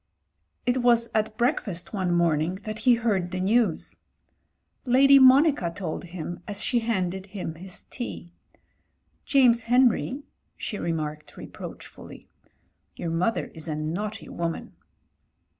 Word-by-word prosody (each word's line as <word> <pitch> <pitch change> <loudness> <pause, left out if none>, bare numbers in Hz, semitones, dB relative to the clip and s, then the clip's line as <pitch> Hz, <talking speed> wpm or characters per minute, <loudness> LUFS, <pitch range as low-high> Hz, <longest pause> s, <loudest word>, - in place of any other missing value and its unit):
It 245 +1 +2
was 235 -1 +3
at 215 0 -1
breakfast 220 - -1
one 185 -3 -1
morning 170 0 +1
that 215 0 -5
he 245 +2 +5
heard 210 -6 0
the 185 +1 -4
news. 205 -2 +1 0.9
Lady 275 +2 +6
Monica 265 - +5
told 170 -1 -5
him 175 0 -7
as 205 -1 -4
she 240 - +1
handed 190 -4 -2
him 190 -5 -5
his 180 +3 -7
tea, 210 -8 -7 0.9
"Jsmes 250 -4 +5
Henry," 250 +3 +2 0.3
she 210 - -5
remarked 155 -2 -4
reproachfully, - - -10 0.7
"your 165 - -4
mother 180 +7 -1
is 160 +1 -8
a 155 - -2
naughty 195 +9 -4
woman." 170 -1 -4
200 Hz, 125 wpm, -26 LUFS, 170-240 Hz, 0.9 s, Lady